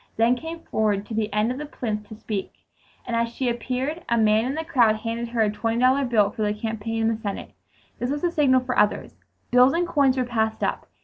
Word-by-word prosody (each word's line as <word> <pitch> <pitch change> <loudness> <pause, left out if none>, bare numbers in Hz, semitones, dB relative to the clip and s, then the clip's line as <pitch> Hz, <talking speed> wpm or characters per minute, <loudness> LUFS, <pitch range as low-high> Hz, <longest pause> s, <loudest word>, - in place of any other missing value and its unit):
then 230 +2 +4
came 325 +5 -7
forward 210 -6 0
to 225 - -8
the 215 0 -1
end 210 +3 +1
of 255 - -5
the 300 - -4
plinth 210 -6 -4
to 215 - -8
speak, 210 -2 -4 0.5
and 235 - -2
as 230 0 +1
she 250 +2 -3
appeared, 255 +7 -2
a 235 - +2
man 220 0 +3
in 265 +3 -2
the 320 +1 -3
crowd 240 -9 +3
handed 230 +2 -4
her 235 -1 0
a 210 -1 +3
twenty 225 +2 -1
dollar 260 +3 +4
bill 215 -5 +2
for 220 - -6
the 210 0 0
campaign 225 0 -3
in - - +3
the 225 -1 -1
Senate. 200 -3 -5 0.5
This 245 - -2
was 290 +3 -2
the 350 - +2
signal 270 -5 +3
for 250 0 -3
others. 210 - +1 0.4
Bills 250 +2 +6
and 345 +1 0
coins 280 -6 +2
were 255 - +1
passed 220 -2 -1
up. - - -2
235 Hz, 240 wpm, -24 LUFS, 220-260 Hz, 0.5 s, Bills